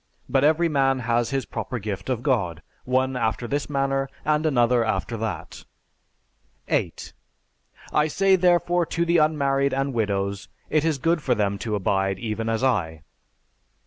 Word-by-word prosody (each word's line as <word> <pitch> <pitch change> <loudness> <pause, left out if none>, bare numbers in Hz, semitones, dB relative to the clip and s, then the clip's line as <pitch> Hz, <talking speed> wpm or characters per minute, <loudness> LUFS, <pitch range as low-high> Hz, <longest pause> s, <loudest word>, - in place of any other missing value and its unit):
But 135 0 +2
every 160 +3 +4
man 135 -3 +2
has 120 -1 0
his 135 -1 -2
proper 125 - -4
gift 105 +1 -5
of 125 -2 -1
God, 95 - 0 0.2
one 130 +1 +1
after 115 0 -1
this 145 +4 -2
manner, 135 -1 0 0.2
and 155 +1 +2
another 120 -4 +3
after 115 +1 -2
that. 110 -4 -5 1.0
8. - - -2 0.8
I 150 +1 +3
say 190 +4 +3
therefore 175 -1 +2
to 170 - -1
the 170 0 +3
unmarried 140 -3 +2
and 135 0 -1
widows, 100 -3 -2 0.2
it 155 -1 +2
is 160 -3 +1
good 165 +4 +1
for 125 -3 +1
them 100 -2 0
to 110 0 -2
abide 95 -1 0
even 110 +2 -3
as 115 +2 -1
I. 80 - 0
130 Hz, 155 wpm, -24 LUFS, 110-150 Hz, 1.0 s, every